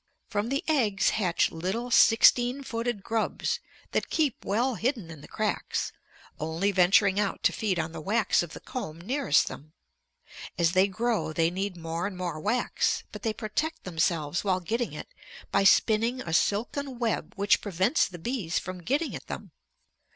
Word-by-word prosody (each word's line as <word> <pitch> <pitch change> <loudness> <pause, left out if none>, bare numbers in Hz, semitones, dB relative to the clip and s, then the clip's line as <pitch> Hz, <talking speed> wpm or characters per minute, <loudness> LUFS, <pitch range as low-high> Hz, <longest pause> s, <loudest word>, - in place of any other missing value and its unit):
From 210 +2 -1
the 275 +2 -1
eggs 230 -11 +2
hatch 185 -5 +1
little 190 +9 -3
sixteen 245 +4 +5
footed 230 -4 -3
grubs 225 -1 -1 0.3
that - - -1
keep 305 -6 0
well 240 +6 +1
hidden 225 - -2
in 155 -3 -11
the - - -12
cracks, 215 -1 -2 0.5
only 165 +6 0
venturing 195 +2 +4
out 205 -2 -1
to - - +4
feed 200 -5 -1
on 160 0 -2
the 160 - -7
wax 215 +6 +2
of 175 -2 -6
the - - -8
comb 165 -11 -6
nearest 245 - +2
them. 155 +2 -9 0.8
As 170 -1 +3
they 185 +2 +4
grow 220 -3 -1
they 165 +1 +2
need 190 0 -3
more 165 +2 -3
and 195 -3 -7
more 175 -3 -3
wax, 225 +8 0
but - - -8
they 225 - 0
protect 240 +10 -3
themselves 165 -2 0
while 190 -2 +1
getting 230 +6 -2
it - - -8 0.4
by - - +3
spinning 225 +5 +4
a 160 - -5
silken 245 - 0
web 235 -2 -1
which 200 0 +3
prevents 200 - +1
the 180 - -9
bees 185 -3 -2
from 185 -1 -4
getting 280 - -1
at - - -9
them. - - -7
205 Hz, 170 wpm, -28 LUFS, 175-235 Hz, 0.8 s, sixteen